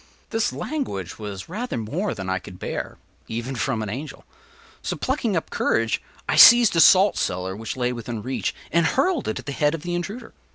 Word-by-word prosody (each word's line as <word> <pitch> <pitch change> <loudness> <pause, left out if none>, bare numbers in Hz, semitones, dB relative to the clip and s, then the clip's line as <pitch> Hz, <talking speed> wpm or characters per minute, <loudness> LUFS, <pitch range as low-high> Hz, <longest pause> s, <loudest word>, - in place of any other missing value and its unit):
” - - -35
This 225 -1 0
language 105 - -4
was 100 -3 -6
rather 220 - -4
more 155 - -2
than 95 -1 -6
I 95 0 0
could 90 0 -11
bear, - - -5 0.3
even 120 +4 -4
from 115 -2 -1
an 105 - -4
angel; 140 +7 -7 0.6
so, - - -3
plucking 245 - -1
up 160 - -4
courage, 115 0 +1 0.3
I - - 0
seized 240 -4 +9
a - - +3
salt 190 +5 +6
cellar 95 +1 -2
which 110 +4 -6
lay 125 0 0
within 115 -2 -6
reach, 130 +1 -2 0.2
and 170 0 +3
hurled 295 - +1
it 110 - -2
at - - -8
the 140 - -4
head 150 +2 +1
of 160 - -8
the 175 0 -3
intruder. 200 +7 -5
140 Hz, 205 wpm, -23 LUFS, -, 0.6 s, seized